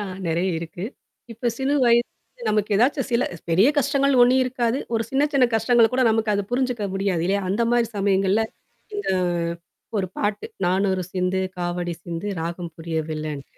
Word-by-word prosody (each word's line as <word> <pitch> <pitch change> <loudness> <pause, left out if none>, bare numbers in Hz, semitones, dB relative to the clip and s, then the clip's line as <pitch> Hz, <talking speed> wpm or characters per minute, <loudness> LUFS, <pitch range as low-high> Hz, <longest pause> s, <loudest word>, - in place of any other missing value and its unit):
ஆ - - -2 0.2
நெறைய 170 +3 0
இருக்கு. 170 +3 -6 0.5
இப்ப 235 +2 -1
சிறு 275 +2 +1
வயதுல 240 - 0
நமக்கு 210 0 0
ஏதாச்சும் 270 +4 +2
சில 235 - +3 0.3
பெரிய 190 +10 +5
கஷ்டங்கள் 275 -1 +2
ஒண்ணும் 255 +2 +5
இருக்காது. 245 0 0 0.2
ஒரு 225 - +2
சின்ன 270 +1 +2
சின்ன 270 -2 +4
கஷ்டங்கள 230 +1 +4
கூட 260 - +3
நமக்கு 220 -1 +1
அத 200 - 0
புரிஞ்சுக்க 245 -4 0
முடியாது. 195 -4 0
இல்லையா? 200 +1 +1
அந்த 220 +5 +1
மாரி 235 -2 +2
சமயங்கள்ல. 195 +2 +2 0.5
இந்த 410 - -3 0.9
ஒரு 190 -2 0
பாட்டு. 205 0 -1 0.2
நானொரு 190 0 +1
சிந்து, 185 +1 0 0.2
காவடி 175 -1 -2
சிந்து, 170 +3 -5
ராகம் 170 0 -5
புரிய 165 0 -4
வில்லன்ட்டு. 155 -2 -6
205 Hz, 160 wpm, -23 LUFS, 180-245 Hz, 0.9 s, பெரிய